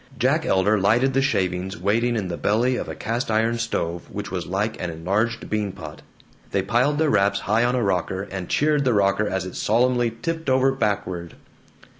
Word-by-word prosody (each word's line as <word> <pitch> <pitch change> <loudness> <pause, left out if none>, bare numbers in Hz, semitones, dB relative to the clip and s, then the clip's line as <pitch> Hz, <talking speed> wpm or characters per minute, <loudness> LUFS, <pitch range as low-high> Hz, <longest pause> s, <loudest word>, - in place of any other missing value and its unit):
Jack 140 +6 +1
Elder 100 +3 +3
lighted 120 +7 +3
the 135 - +2
shavings 95 -6 -1
waiting 115 +5 +1
in 105 -5 -2
the 85 - -3
belly 120 +8 +1
of - - -4
a - - -5
cast 115 +2 -3
iron 115 +2 +1
stove 85 -7 -3
which - - -6
was 90 -3 -4
like 100 +5 -2
an 90 - -2
enlarged 100 +8 -1
bean 105 -2 -1
pot. 80 -4 -10 0.5
They 100 - 0
piled 125 +8 +1
their 155 -1 +2
wraps 100 -1 +2
high 110 +3 +2
on 120 +1 +1
a 125 - +1
rocker, 95 0 -1
and 95 -2 -5
cheered 150 -1 +2
the 125 -4 +2
rocker 100 +1 +2
as 95 -1 -2
it 95 - -7
solemnly 120 +2 +2
tipped 165 -3 -2
over 130 +1 +3
backward. 95 -8 -2
110 Hz, 195 wpm, -23 LUFS, 95-125 Hz, 0.5 s, Elder